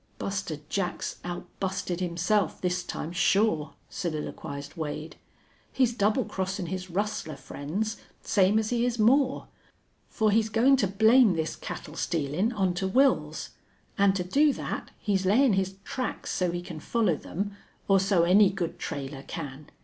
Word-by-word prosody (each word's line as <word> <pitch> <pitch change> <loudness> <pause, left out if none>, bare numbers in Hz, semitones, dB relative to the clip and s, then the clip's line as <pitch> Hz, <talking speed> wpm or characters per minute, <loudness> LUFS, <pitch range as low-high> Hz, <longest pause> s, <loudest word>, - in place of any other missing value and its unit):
"Buster 190 -6 -3
Jack's 190 0 -2
outbusted 180 +1 -4
himself 180 +3 0
this 180 0 0
time, 170 -2 -5
sure," 180 -3 +2
soliloquized 150 -4 -5
Wade. 155 -1 -5 0.6
"He's 250 -3 +2
double 220 +3 +2
crossin' 190 -1 -3
his 185 0 -4
rustler 185 -4 -2
friends, 175 +11 -4 0.3
same 200 +1 +3
as 220 +1 0
he 240 -1 +1
is 245 -1 0
Moore. 260 +5 +3 0.6
For 215 -1 +2
he's 220 +1 +2
goin' 240 +5 +5
to 205 - +2
blame 220 +2 +5
this 160 0 -2
cattle 150 - -7
stealin' 165 - 0
onto 190 -3 0
Wils. 265 +6 +2 0.5
An' 200 -1 +4
to 190 -2 -1
do 285 +12 +4
that - - -5
he's 195 -2 0
layin' 240 +4 +5
his 190 0 0
tracks 255 +2 -4
so 180 -1 0
he 175 +1 -3
can 165 -3 -7
follow 215 0 +1
them, 200 +7 -4 0.3
or 195 -1 +5
so 190 -2 +3
any 190 +3 +6
good 190 -4 -4
trailer 140 -2 -5
can. 140 +1 -7
190 Hz, 150 wpm, -28 LUFS, 170-215 Hz, 0.6 s, any